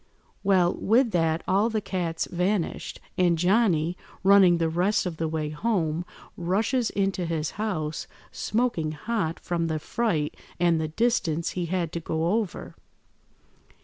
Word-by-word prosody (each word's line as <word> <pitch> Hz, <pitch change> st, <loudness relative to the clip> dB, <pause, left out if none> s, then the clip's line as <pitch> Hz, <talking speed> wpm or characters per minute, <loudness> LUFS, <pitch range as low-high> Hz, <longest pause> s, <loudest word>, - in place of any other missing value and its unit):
Well, 185 Hz, -3 st, +4 dB
with 230 Hz, +3 st, +2 dB
that 165 Hz, -2 st, +1 dB
all 200 Hz, +4 st, +3 dB
the 220 Hz, -1 st, 0 dB
cats 175 Hz, -5 st, -2 dB
vanished, 180 Hz, 0 st, -1 dB, 0.2 s
and 175 Hz, -2 st, +4 dB
Johnny, 180 Hz, -3 st, +2 dB, 0.3 s
running 190 Hz, -3 st, +6 dB
the 165 Hz, -1 st, +1 dB
rest 180 Hz, +7 st, +1 dB
of 175 Hz, -3 st, -4 dB
the 160 Hz, -, -1 dB
way 155 Hz, -1 st, -2 dB
home, 170 Hz, -2 st, -1 dB, 0.3 s
rushes 215 Hz, +8 st, 0 dB
into 195 Hz, -3 st, -1 dB
his 160 Hz, -2 st, -2 dB
house, 170 Hz, -8 st, -3 dB, 0.2 s
smoking 210 Hz, -9 st, -1 dB
hot 165 Hz, 0 st, -2 dB
from 170 Hz, -2 st, -1 dB
the 160 Hz, -1 st, -1 dB
fright 155 Hz, -3 st, -1 dB, 0.2 s
and 170 Hz, -2 st, +3 dB
the 155 Hz, -, -1 dB
distance 170 Hz, -4 st, 0 dB
he 175 Hz, -2 st, -3 dB
had 175 Hz, -2 st, -1 dB
to 170 Hz, -, -3 dB
go 165 Hz, +2 st, -1 dB
over. 205 Hz, -7 st, -6 dB
175 Hz, 145 wpm, -26 LUFS, 160-200 Hz, 0.3 s, running